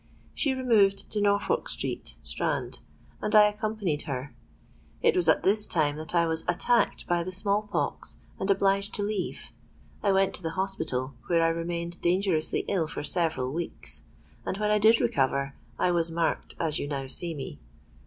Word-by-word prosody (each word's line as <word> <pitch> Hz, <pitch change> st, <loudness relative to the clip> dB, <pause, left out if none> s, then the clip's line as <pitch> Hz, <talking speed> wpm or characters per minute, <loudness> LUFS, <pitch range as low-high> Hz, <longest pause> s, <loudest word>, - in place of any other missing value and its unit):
She 275 Hz, -3 st, 0 dB
removed 215 Hz, -7 st, +2 dB
to 210 Hz, -, -1 dB
Norfolk 205 Hz, -, +1 dB
Street, -, -, -4 dB
Strand: -, -, -2 dB, 0.4 s
and 210 Hz, -, 0 dB
I 210 Hz, -, +10 dB
accompanied 210 Hz, -7 st, -2 dB
her. 135 Hz, +1 st, -4 dB, 0.7 s
It -, -, +4 dB
was 175 Hz, -3 st, +4 dB
at 160 Hz, -, +4 dB
this 210 Hz, +2 st, +5 dB
time 150 Hz, -4 st, +1 dB
that 160 Hz, +3 st, -5 dB
I 170 Hz, -1 st, +4 dB
was 160 Hz, 0 st, +1 dB
attacked 230 Hz, +7 st, +1 dB
by 175 Hz, -1 st, +1 dB
the 185 Hz, -, -5 dB
small 200 Hz, +2 st, +1 dB
pox, -, -, -2 dB, 0.2 s
and 190 Hz, -, -2 dB
obliged 195 Hz, 0 st, +2 dB
to 205 Hz, -, -1 dB
leave. 205 Hz, -2 st, -3 dB, 0.5 s
I 200 Hz, -, +2 dB
went 195 Hz, 0 st, +3 dB
to -, -, -5 dB
the 165 Hz, -1 st, -3 dB
hospital, 155 Hz, -9 st, -2 dB
where 170 Hz, -1 st, +3 dB
I 165 Hz, -, +4 dB
remained 170 Hz, +1 st, -3 dB
dangerously 175 Hz, -2 st, +1 dB
ill 175 Hz, -5 st, 0 dB
for 155 Hz, -, -5 dB
several 155 Hz, -6 st, +1 dB
weeks; 170 Hz, +1 st, -5 dB, 0.4 s
and, 190 Hz, -, -3 dB
when 210 Hz, 0 st, 0 dB
I 210 Hz, -, +4 dB
did 220 Hz, +2 st, +6 dB
recover, 140 Hz, 0 st, +1 dB, 0.2 s
I 180 Hz, -, +2 dB
was 170 Hz, -1 st, +2 dB
marked 165 Hz, 0 st, -1 dB
as 160 Hz, -3 st, 0 dB
you -, -, -3 dB
now 140 Hz, -2 st, -3 dB
see 165 Hz, +5 st, 0 dB
me. 130 Hz, -, -7 dB
175 Hz, 175 wpm, -28 LUFS, 160-200 Hz, 0.7 s, I